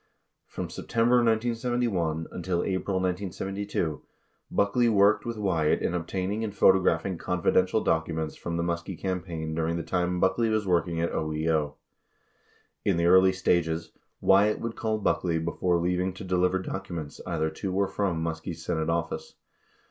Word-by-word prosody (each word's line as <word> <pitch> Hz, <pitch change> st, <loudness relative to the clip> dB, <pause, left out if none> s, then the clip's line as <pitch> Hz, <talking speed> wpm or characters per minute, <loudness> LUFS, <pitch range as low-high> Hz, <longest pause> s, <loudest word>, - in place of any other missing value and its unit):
From -, -, -6 dB
September 115 Hz, +2 st, +2 dB
1971 115 Hz, -8 st, 0 dB
until 90 Hz, 0 st, -2 dB
April 95 Hz, 0 st, -1 dB
1972, 95 Hz, -2 st, -2 dB, 0.5 s
Buckley 115 Hz, +4 st, +2 dB
worked 105 Hz, +1 st, +4 dB
with 115 Hz, -1 st, -3 dB
Wyatt 85 Hz, -7 st, +1 dB
in -, -, 0 dB
obtaining 95 Hz, +5 st, -2 dB
and 105 Hz, -2 st, -4 dB
photographing 95 Hz, -2 st, +3 dB
confidential 90 Hz, +3 st, +1 dB
documents 80 Hz, -1 st, -1 dB
from 85 Hz, 0 st, -4 dB
the 85 Hz, -, 0 dB
Muskie 85 Hz, +1 st, -3 dB
campaign 85 Hz, -4 st, -3 dB
during 80 Hz, +1 st, -1 dB
the 85 Hz, -, -3 dB
time 90 Hz, 0 st, -1 dB
Buckley 105 Hz, +6 st, +2 dB
was 110 Hz, -1 st, 0 dB
working 85 Hz, -2 st, +1 dB
at 85 Hz, -, 0 dB
OEO. 80 Hz, -1 st, -1 dB, 1.1 s
In 95 Hz, -4 st, +2 dB
the 85 Hz, -, +1 dB
early 95 Hz, +2 st, +6 dB
stages, 85 Hz, -3 st, 0 dB, 0.3 s
Wyatt 100 Hz, +2 st, +4 dB
would 115 Hz, -1 st, -4 dB
call 110 Hz, -1 st, -1 dB
Buckley 90 Hz, -5 st, 0 dB
before 85 Hz, +2 st, 0 dB
leaving 90 Hz, +2 st, 0 dB
to 95 Hz, -, -9 dB
deliver 90 Hz, 0 st, +1 dB
documents 90 Hz, -5 st, -6 dB
either 80 Hz, -3 st, -1 dB
to 95 Hz, +4 st, -4 dB
or 100 Hz, +1 st, +1 dB
from 90 Hz, -6 st, -1 dB
Muskie's 80 Hz, 0 st, -5 dB
Senate 80 Hz, -2 st, -1 dB
office. 85 Hz, -2 st, -3 dB
90 Hz, 145 wpm, -27 LUFS, 85-100 Hz, 1.1 s, early